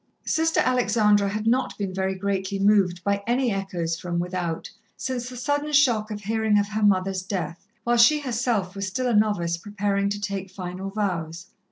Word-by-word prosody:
Sister 320 Hz, +1 st, +1 dB
Alexandra 215 Hz, -5 st, +3 dB
had 210 Hz, +2 st, -3 dB
not 250 Hz, +3 st, +1 dB
been 195 Hz, -2 st, -3 dB
very 190 Hz, 0 st, -1 dB
greatly 195 Hz, 0 st, -2 dB
moved 195 Hz, -3 st, +3 dB
by 200 Hz, 0 st, 0 dB
any 245 Hz, 0 st, +2 dB
echoes 175 Hz, -4 st, -2 dB
from 175 Hz, -1 st, -3 dB
without, 175 Hz, -2 st, -2 dB, 0.3 s
since 250 Hz, -2 st, -3 dB
the 250 Hz, -, -9 dB
sudden 290 Hz, +4 st, -1 dB
shock 240 Hz, -7 st, +4 dB
of 210 Hz, -1 st, -5 dB
hearing 220 Hz, 0 st, +1 dB
of 205 Hz, 0 st, +1 dB
her 215 Hz, +1 st, -2 dB
mother's 190 Hz, -2 st, +2 dB
death, 185 Hz, -1 st, -5 dB, 0.2 s
while 240 Hz, 0 st, +2 dB
she 270 Hz, +6 st, +6 dB
herself 235 Hz, -7 st, -1 dB
was 195 Hz, -1 st, -3 dB
still 255 Hz, +7 st, -2 dB
a 245 Hz, -, +1 dB
novice 205 Hz, -6 st, +2 dB
preparing 200 Hz, +1 st, -1 dB
to 205 Hz, 0 st, -3 dB
take 200 Hz, -2 st, -4 dB
final 185 Hz, +1 st, -6 dB
vows. 175 Hz, -4 st, -3 dB
200 Hz, 180 wpm, -25 LUFS, 190-230 Hz, 0.3 s, she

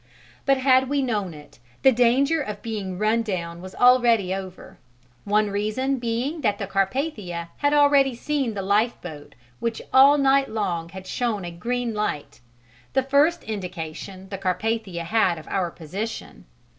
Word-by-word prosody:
But 275 Hz, 0 st, +4 dB
had 260 Hz, 0 st, +3 dB
we 285 Hz, -1 st, +1 dB
known 210 Hz, -7 st, -1 dB
it, 150 Hz, -4 st, -15 dB, 0.2 s
the 265 Hz, -, +7 dB
danger 260 Hz, +6 st, +3 dB
of 210 Hz, -6 st, -6 dB
being 205 Hz, -5 st, -4 dB
run 215 Hz, +3 st, +2 dB
down 170 Hz, -6 st, -4 dB
was 185 Hz, +1 st, -10 dB
already 240 Hz, -6 st, +4 dB
over, 190 Hz, -1 st, -8 dB, 0.5 s
one 210 Hz, 0 st, +2 dB
reason 215 Hz, +7 st, -1 dB
being 245 Hz, +7 st, -2 dB
that 210 Hz, -6 st, +1 dB
the 200 Hz, -, -3 dB
Carpathia 195 Hz, -, -2 dB
had 285 Hz, 0 st, +1 dB
already 285 Hz, -3 st, +4 dB
seen 270 Hz, -3 st, -2 dB
the 195 Hz, -, -3 dB
lifeboat 190 Hz, -7 st, -1 dB, 0.2 s
which 230 Hz, -1 st, -2 dB
all 275 Hz, +2 st, +7 dB
night 275 Hz, 0 st, +3 dB
long 180 Hz, -6 st, -2 dB
had 190 Hz, +1 st, -9 dB
shown 215 Hz, -2 st, -2 dB
a 175 Hz, -, -5 dB
green 235 Hz, +7 st, -2 dB
light, 210 Hz, -8 st, -3 dB, 0.5 s
the 265 Hz, -, +2 dB
first 290 Hz, +6 st, +2 dB
indication 185 Hz, -1 st, -6 dB
the 195 Hz, -1 st, -5 dB
Carpathia 195 Hz, -1 st, -2 dB
had 185 Hz, -2 st, +2 dB
of 160 Hz, -, -11 dB
our 185 Hz, -3 st, 0 dB
position. 190 Hz, +8 st, -7 dB
215 Hz, 155 wpm, -24 LUFS, 190-260 Hz, 0.5 s, the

